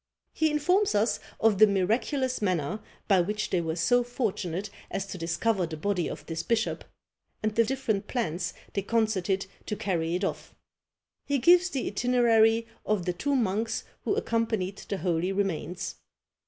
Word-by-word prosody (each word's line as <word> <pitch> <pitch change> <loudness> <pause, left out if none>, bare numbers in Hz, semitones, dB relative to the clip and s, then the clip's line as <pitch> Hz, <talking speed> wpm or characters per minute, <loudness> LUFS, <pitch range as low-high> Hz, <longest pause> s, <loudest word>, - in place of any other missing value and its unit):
He 315 0 +2
informs 360 - +2
us 210 +2 +2 0.2
of 215 -3 +3
the 215 - +9
miraculous 230 +7 0
manner 185 -1 0 0.3
by 195 -4 +5
which 210 +4 -2
they 180 - +2
were 160 -1 -2
so 245 +9 +3
fortunate 210 -6 -3 0.2
as 195 - -2
to 195 - -7
discover 180 +3 0
the 160 -1 -6
body 180 +1 0
of - - -7
this 165 -1 -3
bishop, 230 -1 0 0.6
and 215 0 +1
the 230 - +4
different 220 -5 -1
plans 180 -7 -2 0.2
they 200 - 0
concerted 200 -3 0 0.2
to 210 - -1
carry 175 -5 -1
it 185 - -2
off. - - -3 0.7
He 285 - +2
gives 350 +7 +5
the 270 -6 -2
itinerary 230 -1 +3 0.2
of 205 -4 0
the 180 - 0
two 285 +10 -1
monks 225 -2 0 0.2
who 405 - +1
accompanied 220 - -1
the 200 - -1
holy 175 +1 0
remains. 185 -2 -2
210 Hz, 160 wpm, -28 LUFS, 185-235 Hz, 0.7 s, the